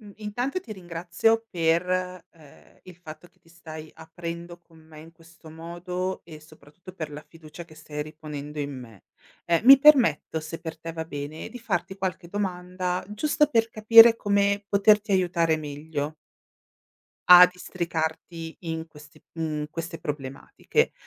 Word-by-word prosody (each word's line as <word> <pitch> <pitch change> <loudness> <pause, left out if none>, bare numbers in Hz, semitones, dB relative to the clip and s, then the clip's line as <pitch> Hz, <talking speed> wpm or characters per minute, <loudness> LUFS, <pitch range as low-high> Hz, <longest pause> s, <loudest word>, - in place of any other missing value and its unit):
M 210 -2 -13
intanto 245 - -3
ti 230 - -9
ringrazio 180 +5 -1
per, 165 0 +2 0.5
ehm, 155 -4 -20
il 180 -2 -13
fatto 175 0 -12
che - - -36
ti - - -27
stai 160 -2 -11
aprendo 170 +1 -8
con 165 -1 -22
me 155 -1 -15
in 165 +1 -14
questo 165 0 -18
modo 175 +3 -5
e 155 -2 -12
soprattutto 155 +3 -16
per 155 -3 -6
la 150 +1 -9
fiducia 165 0 -12
che 160 -2 -17
stai 150 -1 -6
riponendo 150 -1 -8
in 145 -1 -3
me. 115 -6 -14 0.4
Ehm, 170 +4 +1
mi 270 +2 +10
permetto, 245 - +4
se 160 +1 -7
per 160 -1 -7
te 165 +1 -7
va 160 0 -5
bene, 145 0 -7
di 245 - -10
farti 190 -5 -3
qualche 185 -2 -4
domanda 180 -1 -3
giusto 300 +7 +1
per 230 -6 +1
capire 225 +1 +8
come 200 -1 +1
poterti 205 0 +3
aiutare 170 -3 +2
meglio. 150 0 -5 1.1
A 180 0 +11
districarti 165 -2 -5
in 160 -1 -5
queste 150 -1 -17
mhmm, 155 -2 -3
queste 165 +1 -6
problematiche. 135 -3 -2
170 Hz, 150 wpm, -25 LUFS, 155-185 Hz, 1.1 s, A